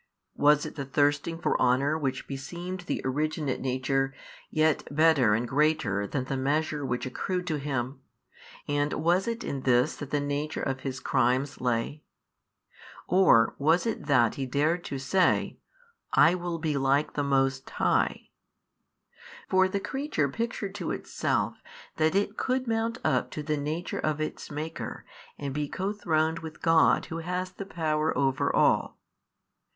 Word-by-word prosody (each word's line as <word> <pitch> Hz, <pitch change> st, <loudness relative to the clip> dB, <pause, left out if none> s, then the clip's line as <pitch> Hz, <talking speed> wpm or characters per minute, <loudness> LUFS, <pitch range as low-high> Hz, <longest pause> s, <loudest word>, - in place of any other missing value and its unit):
was 150 Hz, 0 st, +4 dB
it -, -, -6 dB
the 140 Hz, -, -4 dB
thirsting 145 Hz, +4 st, +1 dB
for -, -, 0 dB
honour 130 Hz, +4 st, +3 dB
which 140 Hz, -4 st, -2 dB
beseemed 175 Hz, +7 st, -6 dB
the -, -, -1 dB
originate 150 Hz, +1 st, -1 dB
nature, 135 Hz, +1 st, 0 dB, 0.3 s
yet 155 Hz, 0 st, +2 dB
better 145 Hz, -7 st, +4 dB
and 120 Hz, +2 st, -1 dB
greater 135 Hz, -8 st, +1 dB
than 130 Hz, +3 st, -2 dB
the 135 Hz, -, -3 dB
measure 145 Hz, +2 st, 0 dB
which 125 Hz, -1 st, -2 dB
accrued 180 Hz, +8 st, -3 dB
to 160 Hz, -4 st, -1 dB
him, 135 Hz, -2 st, -3 dB, 0.7 s
and 145 Hz, 0 st, 0 dB
was 175 Hz, +6 st, +1 dB
it 230 Hz, +1 st, -3 dB
in 140 Hz, -, -3 dB
this 125 Hz, -1 st, +3 dB
that 145 Hz, -, -7 dB
the 145 Hz, -, 0 dB
nature 145 Hz, +2 st, -2 dB
of 135 Hz, -1 st, -2 dB
his 130 Hz, -1 st, -4 dB
crimes 130 Hz, +2 st, +1 dB
lay? 125 Hz, +4 st, -1 dB, 1.1 s
or 175 Hz, -11 st, +5 dB
was 160 Hz, +7 st, +3 dB
it 225 Hz, -9 st, -3 dB
that 120 Hz, -6 st, +4 dB
he 135 Hz, -1 st, -4 dB
dared 155 Hz, +6 st, +1 dB
to 140 Hz, -, -4 dB
say, 180 Hz, +8 st, +1 dB, 0.5 s
I 155 Hz, +4 st, +6 dB
will 175 Hz, -2 st, -3 dB
be 155 Hz, -3 st, -1 dB
like 140 Hz, +2 st, +1 dB
the 145 Hz, -, -1 dB
Most 135 Hz, -1 st, +1 dB
High? -, -, 0 dB, 1.2 s
For 190 Hz, 0 st, +4 dB
the 200 Hz, +1 st, -2 dB
creature 265 Hz, -, -1 dB
pictured 210 Hz, -, -3 dB
to -, -, -2 dB
itself -, -, -2 dB, 0.4 s
that 160 Hz, +2 st, +2 dB
it 200 Hz, +1 st, 0 dB
could 260 Hz, 0 st, 0 dB
mount 225 Hz, +1 st, 0 dB
up -, -, +1 dB
to 150 Hz, -, -5 dB
the 155 Hz, +1 st, 0 dB
Nature 155 Hz, +4 st, -3 dB
of 155 Hz, -1 st, -1 dB
its 155 Hz, -, -4 dB
Maker 155 Hz, +2 st, -6 dB, 0.3 s
and 140 Hz, -2 st, -4 dB
be 145 Hz, 0 st, -2 dB
co 195 Hz, +2 st, -2 dB
throned 160 Hz, -5 st, 0 dB
with 160 Hz, -1 st, -9 dB
God 165 Hz, -1 st, +4 dB
Who 165 Hz, -1 st, -5 dB
has 180 Hz, +2 st, -3 dB
the 195 Hz, +1 st, -8 dB
power 155 Hz, -3 st, 0 dB
over 135 Hz, -2 st, +1 dB
all. -, -, +2 dB
150 Hz, 155 wpm, -28 LUFS, 135-165 Hz, 1.2 s, I